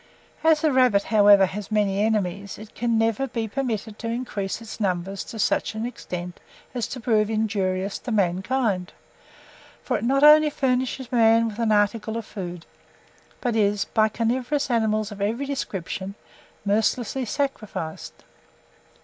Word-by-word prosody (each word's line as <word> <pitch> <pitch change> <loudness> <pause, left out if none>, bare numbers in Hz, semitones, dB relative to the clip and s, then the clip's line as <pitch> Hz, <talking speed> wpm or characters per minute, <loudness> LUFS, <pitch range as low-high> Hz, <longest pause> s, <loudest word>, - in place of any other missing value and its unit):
As 320 -1 +4
the 315 -2 +3
rabbit, 250 -6 +4
however, 205 -2 +6
has 195 +2 -6
many 205 -2 +1
enemies, 200 -2 -1
it 215 0 -12
can 235 -1 0
never 225 +4 +1
be 230 -3 -3
permitted 220 -3 -3
to 230 - -4
increase 230 -5 -3
in 225 -1 -6
numbers 190 +1 -2
to 225 - -8
such 220 - 0
an 220 +1 -3
extent 180 -7 -6 0.3
as 245 -3 -2
to 260 - -6
prove 215 -3 +2
injurious 200 -3 -1
to 245 - -6
mankind; 190 0 0 0.9
for - - 0
it - - -7
not 275 +4 +2
only 305 +1 +8
furnishes 260 -2 -1
man 230 -1 +4
with 215 +1 -9
an 230 -2 +1
article 215 +2 +1
of 230 - -5
food, 175 -5 -7 0.8
but 240 -3 -1
is, 205 -2 +2
by 220 -1 +2
carnivorous 250 +6 -1
animals 215 -2 +1
of 200 -1 -8
every 230 +7 -1
description, 195 -7 -4 0.5
mercilessly 220 +5 0
sacrificed. 215 - -4
220 Hz, 150 wpm, -24 LUFS, 200-245 Hz, 0.9 s, only